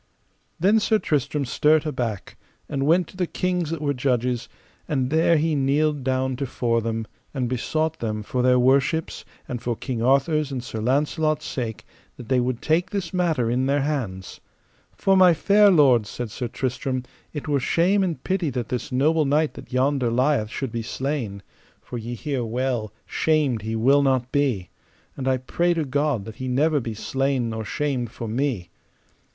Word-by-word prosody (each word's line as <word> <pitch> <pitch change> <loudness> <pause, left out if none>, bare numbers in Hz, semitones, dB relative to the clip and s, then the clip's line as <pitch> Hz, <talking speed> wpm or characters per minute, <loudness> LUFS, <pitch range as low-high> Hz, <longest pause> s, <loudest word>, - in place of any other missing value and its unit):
Then 205 +6 +4
Sir 220 +1 +2
Tristram 145 - -1
stert 150 +4 +3
aback, 120 - -3 0.3
and 140 -1 -1
went 170 +1 +4
to - - -14
the 180 -2 0
kings 180 -3 -1
that 160 -2 -4
were 145 -1 +1
judges, 125 -2 -1 0.4
and 135 -3 -1
there 160 +1 +4
he 160 +1 +1
kneeled 145 +1 +1
down 130 0 0
to 135 0 -2
fore 115 -2 0
them, 115 0 -2 0.3
and 130 -3 0
besought 155 +6 -1
them 110 -2 -3
for 125 +4 -2
their 125 0 +4
worships, 135 +5 +2 0.2
and 120 -2 -4
for 120 -1 -1
King 120 0 -4
Arthur's 140 +4 +2
and 130 -3 -4
Sir 110 -3 -5
Launcelot's 150 +6 0
sake, 115 -4 -4 0.3
that 120 - -10
they 130 -1 +3
would 125 -1 -2
take 165 +3 +1
this 195 -4 -4
matter 165 -9 +1
in 130 +2 +1
their 140 +1 +2
hands. 110 -11 -3 0.5
For, 195 - +2
my 185 -3 +6
fair 205 +4 +5
lords, 130 - +4
said 120 -3 -5
Sir 125 +1 -4
Tristram, 130 +1 -2 0.3
it 150 -1 -6
were 145 -2 +2
shame 185 +9 +2
and 175 -4 -3
pity 185 -4 0
that 120 -3 -4
this 125 -3 -3
noble 155 +5 +2
knight 150 +2 +2
that - - -12
yonder 130 -1 +1
lieth 125 -2 +1
should 130 +1 -4
be 115 - -3
slain; 120 -5 -3 0.4
for 120 - -7
ye 120 +2 -5
hear 135 -1 -2
well, 120 -2 -2
shamed 150 -8 +1
will 135 +6 +4
he - - +1
not 130 -2 +1
be, 125 -11 0 0.4
and 135 -1 -4
I 130 -1 +3
pray 170 +7 0
to 160 -2 0
God 140 -5 0
that 110 - -9
he 130 - -4
never 145 +4 +2
be 115 -3 -5
slain 135 0 -1
nor 110 0 -4
shamed 130 0 -2
for 115 +1 -7
me. 115 -7 -2
135 Hz, 180 wpm, -24 LUFS, 120-155 Hz, 0.5 s, my